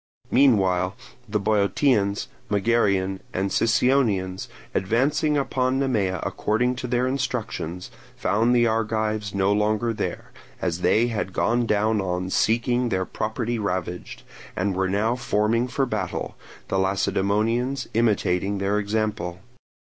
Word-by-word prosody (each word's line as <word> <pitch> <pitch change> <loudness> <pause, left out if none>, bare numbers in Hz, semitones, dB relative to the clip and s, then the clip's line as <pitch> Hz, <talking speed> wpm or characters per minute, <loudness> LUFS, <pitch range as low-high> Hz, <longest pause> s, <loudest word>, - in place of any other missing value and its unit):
Meanwhile 95 -8 +3 0.3
the 105 +1 0
Boeotians, 100 +1 +1 0.2
Megarians, 100 -3 +1 0.2
and 95 +1 -1
Sicyonians, 110 -6 +1 0.3
advancing 140 - +1
upon 130 -1 0
Nemea 110 -9 0
according 125 +4 0
to 125 - -4
their 125 +1 +1
instructions, 115 -9 -3 0.2
found 115 +4 +2
the 120 -1 +4
Argives 110 -2 -1
no 100 +1 +2
longer 110 +2 +1
there, - - -4 0.3
as 90 -1 -2
they 115 +6 +3
had 105 -4 -3
gone 120 +3 +1
down 105 0 +2
on 90 0 -2
seeing 120 +3 +1
their 95 -3 0
property 110 +3 -3
ravaged, 90 -3 -4 0.3
and 95 +2 0
were 95 0 0
now 110 +5 +1
forming 115 0 +1
for 135 +2 0
battle, 105 -7 -3 0.3
the 95 - +1
Lacedaemonians 105 +7 0
imitating 100 -3 +1
their 100 +2 0
example. 105 -4 -2
105 Hz, 120 wpm, -24 LUFS, 95-120 Hz, 0.3 s, the